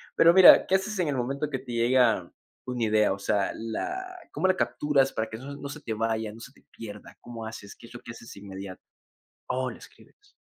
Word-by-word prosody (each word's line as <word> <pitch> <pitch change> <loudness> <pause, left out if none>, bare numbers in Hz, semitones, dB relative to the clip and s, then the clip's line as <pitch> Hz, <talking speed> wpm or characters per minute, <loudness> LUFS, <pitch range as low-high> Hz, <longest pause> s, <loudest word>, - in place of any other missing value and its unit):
Pero, 170 +1 +6
mira, 190 0 +9
¿qué 190 - +3
haces 195 +1 -2
en 170 - +1
el 140 - -1
momento, 140 +4 -2
que 135 -3 -3
te 130 -2 -10
llega 120 +2 +2 0.4
una 125 -2 -3
idea? 105 -2 +3
O 100 - -7
sea, 100 0 0
la 370 - -5 0.2
¿cómo 190 - +1
la 185 - +3
capturas, 140 -2 +1
para 110 0 -2
que 110 - -7
eso 140 +3 -8
no 140 0 -7
se 145 +2 -8
te 110 - -4
vaya, 110 -1 -2
no 115 - -12
se 125 - -10
te - - -25
pierda? 105 -2 -10
¿Cómo 115 -2 -8
haces? 110 -2 -9
¿Qué 115 - -14
es - - -16
lo 120 - -9
que - - -9
haces 115 0 -11
de - - -12
inmediato? 95 -1 -9 0.7
Oh, 130 0 -1
la - - -9
escribes. 410 -1 -19
120 Hz, 235 wpm, -27 LUFS, 110-145 Hz, 0.7 s, mira